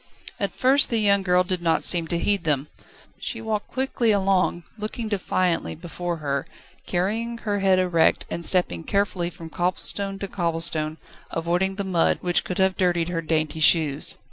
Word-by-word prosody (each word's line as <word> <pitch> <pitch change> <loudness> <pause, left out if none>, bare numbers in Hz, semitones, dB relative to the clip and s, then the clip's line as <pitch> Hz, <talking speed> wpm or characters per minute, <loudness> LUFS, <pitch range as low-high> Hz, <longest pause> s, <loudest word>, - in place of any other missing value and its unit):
At - - -1
first 270 +3 +4
the 230 - +1
young 200 -2 +3
girl 180 -1 +2
did 185 -1 -3
not 165 -1 +1
seem 170 -2 +3
to 170 - -1
heed 200 +1 0
them. 150 -2 -1 0.5
She 230 - -4
walked 220 -2 -3
quickly 260 -3 0
along, 190 -3 +1
looking 215 +1 -5
defiantly 185 -3 -1
before 175 +1 -5
her, 140 -3 -3 0.4
carrying 220 +6 -1
her 205 -3 -2
head 190 -1 +3
erect, 175 -3 +2
and 170 - -5
stepping 165 - +1
carefully 200 -3 -1
from 165 -2 -11
cobblestone 195 +3 -1
to 200 - -5
cobblestone, 165 -4 -1 0.3
avoiding 175 +4 -1
the 200 - -3
mud, 180 -4 +1
which 175 -1 +1
could 180 - -5
have 190 0 +2
dirtied 175 -3 +1
her 170 -2 -2
dainty 155 -1 -1
shoes. 155 -3 +4
180 Hz, 170 wpm, -24 LUFS, 165-200 Hz, 0.5 s, first